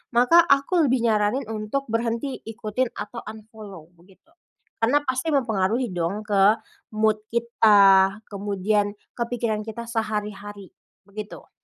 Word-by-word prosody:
maka 250 +8 +6
aku 280 +3 +3
lebih 250 -2 +1
nyaranin 215 +5 +1
untuk 215 +6 -3
berhenti 230 +3 -2
ikutin 225 +2 -2
atau 210 +3 -6
unfollow, 215 -6 -11
begitu. 190 - -24 0.5
Karena 275 +6 +2
pasti 260 +5 -1
mempengaruhi 225 -1 0
dong, 180 +4 -3
ke 205 0 +4 0.4
mood 215 0 +1
kita, 200 -4 +4
kemudian 205 +1 -1 0.2
ke 235 - -1
pikiran 220 -3 -2
kita 235 +2 -6
sehari-hari, 210 -3 -4 0.4
begitu. 210 +1 -9
215 Hz, 120 wpm, -24 LUFS, 205-235 Hz, 0.5 s, maka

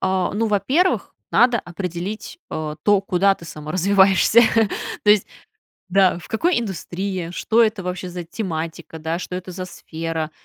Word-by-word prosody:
А, 185 -1 0
ну, 225 +2 +1
во-первых, 270 - +1 0.2
надо 245 -1 +4
определить, 180 - -5
а, 155 -1 -4
то, 205 -2 +4
куда 195 -1 +2
ты 170 - -14
саморазвиваешься. 190 +7 +3 0.6
То 210 - +6
есть, 210 -2 +4 0.6
да, 185 -1 +3
в - - -13
какой 330 +7 +1
индустрии, 190 -3 -4
что 225 +5 +2
это 215 -3 +1
вообще 180 0 -4
за 175 0 -6
тематика, 165 -4 -5
да, 160 +2 -2
что 180 - -6
это 185 0 -7
за 185 +1 -5
сфера. 165 -2 -5
185 Hz, 150 wpm, -21 LUFS, 170-205 Hz, 0.6 s, То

